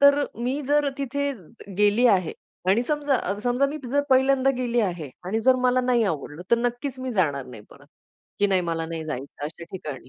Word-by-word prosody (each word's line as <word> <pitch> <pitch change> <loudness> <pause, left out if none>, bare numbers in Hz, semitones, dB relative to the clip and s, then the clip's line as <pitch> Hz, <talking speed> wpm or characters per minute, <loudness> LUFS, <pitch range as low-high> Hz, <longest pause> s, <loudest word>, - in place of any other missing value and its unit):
तर 280 +1 +6 0.2
मी 265 +4 -1
जर 295 0 +3
तिथे 280 +1 -1 0.5
गेली 210 +4 +4
आहे 180 -4 -1 0.4
आणि 215 +5 +4
समजा, 290 -1 0 0.3
समजा 245 +3 +2
मी 300 +2 -5
जर 275 +4 +1
पहिल्यांदा 265 0 +4
गेली 240 -1 +1
आहे 175 -9 -2
आणि 220 +5 -1
जर 260 - +8
मला 255 +1 +3
नाही 245 -2 +2
आवडलं 150 +3 -7
तर 235 - +6
नक्कीच 245 +2 -2
मी 255 -1 -3
जाणार 145 -9 0
नाही 115 -4 -11
परत 140 +1 -17 0.5
की 205 - +4
नाही 190 -2 +2
मला 165 0 -2
नाही 165 -1 -5
जायचं 145 -1 -6
अशा 165 +2 -7
ठिकाणी. 145 -8 -7
235 Hz, 190 wpm, -25 LUFS, 165-265 Hz, 0.5 s, जर